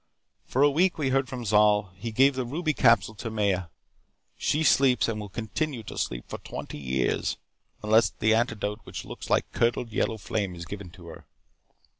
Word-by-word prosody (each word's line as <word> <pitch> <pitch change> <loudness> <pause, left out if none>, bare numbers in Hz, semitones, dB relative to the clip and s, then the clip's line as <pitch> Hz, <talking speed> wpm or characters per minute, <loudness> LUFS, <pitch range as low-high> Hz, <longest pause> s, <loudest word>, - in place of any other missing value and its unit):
"For 135 - +2
a 145 - +5
week 175 +5 +2
we 145 -4 0
heard 135 0 +1
from 125 -2 -5
Zol. 105 -2 +3
He 110 +5 -6
gave 135 +5 +4
the 130 0 -2
ruby 155 +6 -1
capsule 105 -5 +4
to 115 +2 -6
Maya. 100 -4 0 0.7
She 155 +2 0
sleeps 130 -7 +4
and 110 -2 -2
will 105 -1 -7
continue 120 +5 -3
to - - -8
sleep - - -3
for - - -6
twenty - - -7
years 65 -2 -1 0.5
unless 110 0 +4
the 110 +1 +1
antidote 110 -2 0
which - - -7
looks - - -8
like - - +1
curdled 115 0 0
yellow 110 +1 0
flame 100 -3 -3
is 85 0 -7
given 100 0 -7
to 90 - -14
her. 80 - -12
110 Hz, 185 wpm, -27 LUFS, 100-130 Hz, 0.7 s, a